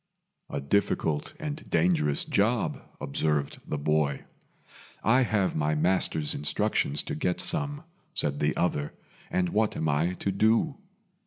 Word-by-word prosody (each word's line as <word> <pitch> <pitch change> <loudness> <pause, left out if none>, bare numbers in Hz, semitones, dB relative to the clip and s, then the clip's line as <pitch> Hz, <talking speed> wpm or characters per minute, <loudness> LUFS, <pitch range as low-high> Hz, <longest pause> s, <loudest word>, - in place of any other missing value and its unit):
"A 70 - -3
difficult 75 0 0
and 155 -1 -6
dangerous 80 -4 +2
job," - - +1 0.2
observed 75 0 -1
the 75 - -2
boy. 75 -1 0 0.8
"I 125 +4 +4
have 110 -6 +1
my 75 0 +1
master's 80 -2 +2
instructions 75 0 0
to - - -5
get 90 +4 -1
some," 145 -3 +2 0.3
said 70 -1 0
the 75 +1 0
other, 75 -4 0 0.4
"and 90 -1 0
what 110 +2 +1
am 80 - -1
I 80 +5 +1
to 100 - -2
do?" 110 - +2
80 Hz, 135 wpm, -28 LUFS, 75-105 Hz, 0.8 s, I